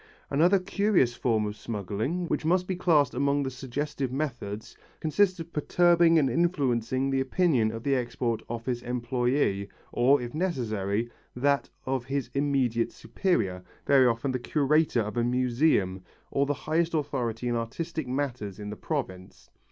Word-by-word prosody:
Another 170 +8 +4
curious 190 - +2
form 115 -3 0
of 105 0 -4
smuggling, 110 - -3
which - - -1
must 180 +3 +2
be 185 - -2
classed 160 -6 +3
among 140 +2 +1
the 130 - -3
suggestive 135 +1 -3
methods, 120 -7 -4 0.2
consists 180 +4 +2
of 165 +1 -8
perturbing 170 +2 +4
and 145 -4 +4
influencing 130 -4 +1
the 135 - +1
opinion 130 -4 +2
of 115 0 -7
the 140 - +1
Export 120 -2 -1
Office 120 +1 -3
employé 120 -3 0 0.2
or, 135 +4 +4
if 120 -1 -6
necessary, 115 - -1 0.3
that 140 +3 +1 0.2
of 130 -2 -1
his 135 -1 -3
immediate 135 -5 +1
superior, 95 - -1 0.2
very 135 -2 +5
often 120 +3 0
the 130 - -2
curator 150 0 +2
of 105 +2 -4
a 120 - +2
museum 120 -6 +1 0.3
or 140 0 +1
the 145 - 0
highest 165 +4 0
authority 125 -6 -2
on 120 - 0
artistic 150 +6 -3
matters 125 -7 -3
in 105 0 -6
the - - -5
province. 95 - -5
130 Hz, 150 wpm, -28 LUFS, 115-155 Hz, 0.3 s, very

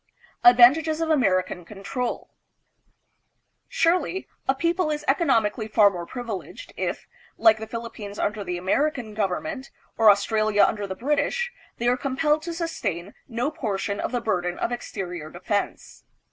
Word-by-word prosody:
Advantages 275 +7 +6
of 325 -1 0
American 185 - +1
Control. 210 +7 -5 1.4
Surely, 360 +2 +1 0.2
a 265 - +3
people 335 +3 0
is 300 -1 -3
economically 230 -7 +2
far 210 -1 +5
more 175 -2 -6
privileged 245 - -7
if, - - -3 0.3
like 225 -1 +5
the 220 - -6
Philippines 225 -3 -7
under 210 0 -1
the 180 -2 -3
American 235 +5 0
government, 260 - -3 0.3
or 220 -1 +7
Australia 215 +1 +3
under 205 -2 +1
the 190 - -5
British, 295 - 0 0.3
they 240 - -1
are 250 +1 +3
compelled 295 +4 +1
to 340 +2 -5
sustain 265 - -3
no 245 +4 -2
portion 200 -6 -3
of - - -2
the 245 -1 -1
burden 180 -5 -1
of - - -2
exterior 180 -9 -5
defense. 185 +4 -4
230 Hz, 140 wpm, -25 LUFS, 200-295 Hz, 1.4 s, or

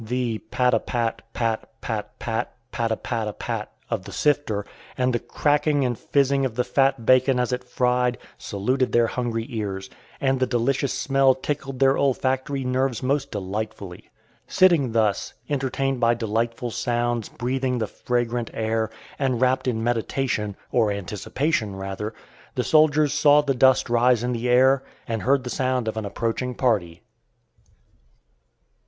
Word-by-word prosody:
The 120 -1 -2
"pat 125 -1 +2
a 115 - +4
pat, 115 -1 -2
pat, 115 -1 -3
pat, 110 -2 -5
pat, 115 +1 -3 0.2
pat 115 -2 -1
a - - +2
pat 115 -3 -3
a 105 - -3
pat" - - -4 0.2
of - - -2
the - - -8
sifter, 145 -9 0 0.3
and 130 -1 +1
the 120 - +1
cracking 145 0 +1
and 120 -1 0
"fizzing" 140 +3 +1
of 125 -4 -2
the 125 - +1
fat 135 -1 +1
bacon 130 +1 +4
as 125 0 0
it 125 0 -2
fried, 125 0 +1 0.2
saluted 125 +6 -1
their 120 0 +5
hungry 115 -1 -2
ears, 100 -5 -4 0.3
and 135 -1 +1
the 130 - +2
delicious 125 +3 0
smell 135 -1 +3
tickled 135 0 -4
their 135 +1 +3
olfactory 135 0 0
nerves 130 -1 0
most 140 +1 0
delightfully. 100 -2 -5 0.4
Sitting 165 -10 +4
thus, 110 -3 +1
entertained 135 -1 -1
by 120 0 +3
delightful 115 +1 -2
sounds, 120 -1 -1
breathing 125 +1 -1
the 110 - 0
fragrant 120 +1 -2
air, 110 0 0 0.3
and 130 -4 +1
wrapped 130 +1 +2
in 115 -3 0
meditation, 115 -2 -1 0.2
or 110 -4 +3
anticipation 105 - -2
rather, 95 +2 -4 0.4
the - - 0
soldiers 155 -2 +4
saw 150 0 +5
the 140 -2 0
dust 130 0 +4
rise 120 0 +3
in 125 - 0
the 120 0 -2
air, 130 +2 +5 0.3
and 115 -3 -2
heard 135 0 +2
the 125 - -5
sound 130 -2 0
of 110 - -2
an 110 -1 -3
approaching 115 +4 -2
party. 100 -10 0
125 Hz, 155 wpm, -24 LUFS, 115-135 Hz, 0.4 s, their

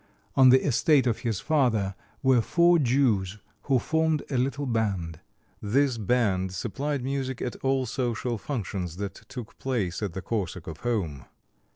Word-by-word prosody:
On 130 -1 +7
the 130 +1 +5
estate 145 0 +3
of 120 -3 0
his 115 -6 -2
father 120 -11 +1 0.3
were 130 -3 +5
four 170 +7 +4
Jews, 115 -8 +2 0.3
who 135 - +3
formed 160 +3 +1
a 135 - +1
little 140 +3 -1
band. 100 - -1 0.4
This 125 +3 +1
band 100 -4 +1
supplied 135 - -3
music 130 -1 -2
at 125 - -3
all 135 -1 0
social 120 -1 -2
functions 95 - -4
that 100 -1 -4
took 120 +2 -10
place 110 -10 -2
at 100 -5 -3
the 95 - -4
Korsakov 90 -7 -4
home. 90 - -2
120 Hz, 150 wpm, -27 LUFS, 100-135 Hz, 0.4 s, On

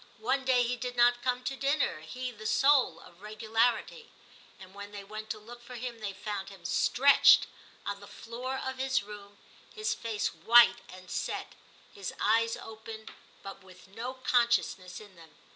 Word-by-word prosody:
One 260 +3 0
day 255 -1 +4
he 245 +1 -1
did 245 0 -5
not 240 0 +4
come 250 0 -1
to 270 +2 -3
dinner, 275 - 0
he 250 +11 -6
the 215 -2 -7
soul 275 +1 +3
of 175 +2 -17
regularity; 225 - -1 0.5
and 190 0 -13
when 200 0 -9
they 205 -1 -8
went 215 +2 -8
to - - -3
look 235 +3 -12
for 245 +1 -10
him 240 -1 -6
they 210 -2 -4
found 195 0 -5
him 190 -3 -14
stretched 275 +9 +5 0.4
on 200 0 -3
the 200 - -12
floor 250 +3 -6
of 265 0 -5
his 265 -5 +1
room, 205 -1 -11 0.4
his 430 0 -1
face 220 -2 -3
white 240 +1 +6
and 185 0 -12
set, - - -3 0.4
his 195 -2 -6
eyes 230 +2 +2
open, 220 0 -9 0.3
but 195 0 -9
with 185 0 -16
no 235 +6 -6
consciousness 235 -7 +1
in 205 -3 -15
them. 165 -2 -17
225 Hz, 175 wpm, -30 LUFS, 200-250 Hz, 0.5 s, white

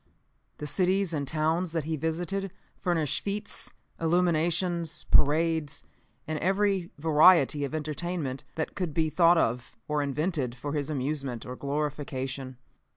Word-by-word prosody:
The 150 - -5
cities 185 +4 +1
and 145 -3 -2
towns 160 +3 0
that 165 -2 0
he 160 +2 -2
visited 175 +5 -2 0.2
furnished 165 -6 -1
fetes, 205 +1 -1 0.3
illuminations, 170 0 +1
parades 155 0 +2 0.4
and 155 -1 -2
every 195 -1 +1
variety 155 -1 +5
of 140 - -5
entertainment 155 -2 -3
that 160 - -2
could 180 -6 -3
be 160 -1 +1
thought 170 +2 +5
of 120 -5 0
or 150 -1 0
invented 145 -2 -1
for 145 +2 -5
his 145 -1 -2
amusement 135 -4 -2
or 125 - -6
glorification. 135 -2 -3
155 Hz, 130 wpm, -28 LUFS, 145-175 Hz, 0.4 s, variety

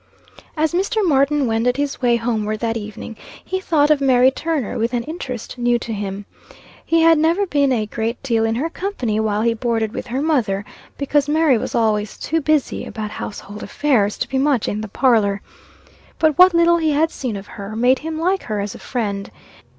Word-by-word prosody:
As 315 +1 +1
Mr. 395 +3 +1
Martin 280 -1 +3
wended 235 +2 +1
his 285 0 -2
way 240 -2 +3
homeward 220 -2 -1
that 230 -1 -1
evening, 215 +1 -7 0.3
he 375 - -2
thought 305 -5 +2
of 295 -2 +3
Mary 260 -1 +5
Turner 305 -4 -2
with 230 +2 -1
an 235 - -1
interest 255 -6 -6
new 240 0 +2
to 230 -1 -5
him. 200 -1 -5 0.6
He 330 0 +2
had 325 -1 +5
never 335 +6 +2
been 285 -6 +1
a 225 -4 +1
great 225 +3 -4
deal 230 -4 +1
in 225 0 0
her 280 +7 -1
company 325 - -3
while 215 -1 0
he 230 0 +2
boarded 225 -2 -1
with - - -5
her 260 +4 -2
mother, 225 -11 0 0.3
because 285 0 +1
Mary 310 -3 +4
was - - -4
always 215 -2 0
too 325 +1 -1
busy 300 -1 0
about 215 -2 -6
household 205 0 -7
affairs, 230 -9 +1
to - - -2
be 265 - -1
much 275 -4 +1
in 210 - -2
the 220 - -5
parlor. 205 -3 +2 0.8
But 310 -2 +2
what 365 +1 +6
little 340 0 +5
he 320 -2 +1
had 320 +3 +2
seen 250 -5 -4
of 195 - -9
her, 205 +1 -8
made 250 +3 +3
him 315 +1 -5
like 370 +4 +1
her 215 -2 -3
as 200 0 -3
a - - -11
friend. 205 -5 -3
250 Hz, 200 wpm, -20 LUFS, 220-305 Hz, 0.8 s, what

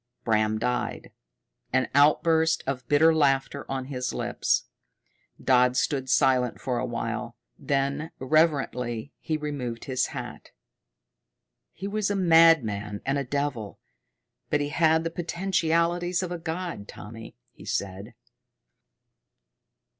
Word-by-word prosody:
Bram 110 -1 +1
died, 125 +2 -2 0.6
an 130 0 +2
outburst 160 +3 +4
of 130 -2 -4
bitter 160 +3 +5
laughter 140 -2 +1
on 135 -1 -3
his 125 -2 -4
lips. - - 0 0.8
Dodd 125 -1 +3
stood 135 -2 0
silent 130 -2 +2
for 125 -2 -2
a 130 - -1
while; 115 -1 -4 0.2
then 140 +3 -1
reverently 135 -4 0
he 155 - -2
removed 140 -6 -5
his 130 -2 0
hat. - - -8 1.2
"He 195 - -6
was 210 0 -1
a 205 - 0
madman 160 - +4
and 140 +1 0
a - - -1
devil, 135 -6 -3 0.7
but 150 - +2
he 145 0 -2
had 160 +1 +3
the 165 - -3
potentialities 175 0 0
of 180 - -4
a 175 - -4
god, 165 - -5
Tommy," 115 +2 -10 0.2
he - - -15
said. 100 +1 -4
140 Hz, 120 wpm, -26 LUFS, 125-165 Hz, 1.2 s, bitter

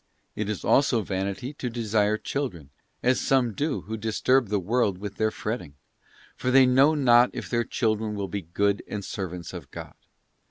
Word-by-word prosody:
It 105 -1 -3
is 105 - -4
also 125 -5 +3
vanity 100 +8 -3
to 130 -3 -4
desire 110 -2 +1
children; 95 - -4 0.3
as 125 +1 +2
some 130 -4 +2
do 145 +5 -1
who 110 +1 -6
disturb 115 +3 +1
the 105 +1 0
world 105 0 0
with 100 +1 -7
their 110 0 +2
fretting; 105 -9 -5 0.6
for 125 - -2
they 130 +1 +7
know 135 +5 +5
not 125 -3 +5
if - - -5
their 120 -1 +2
children 110 -3 -1
will 100 -1 -3
be 100 +1 -4
good 100 +4 0
and 100 -2 -5
servants 90 -5 -5
of 85 -7 -8
God. - - -9
110 Hz, 175 wpm, -26 LUFS, 100-125 Hz, 0.6 s, they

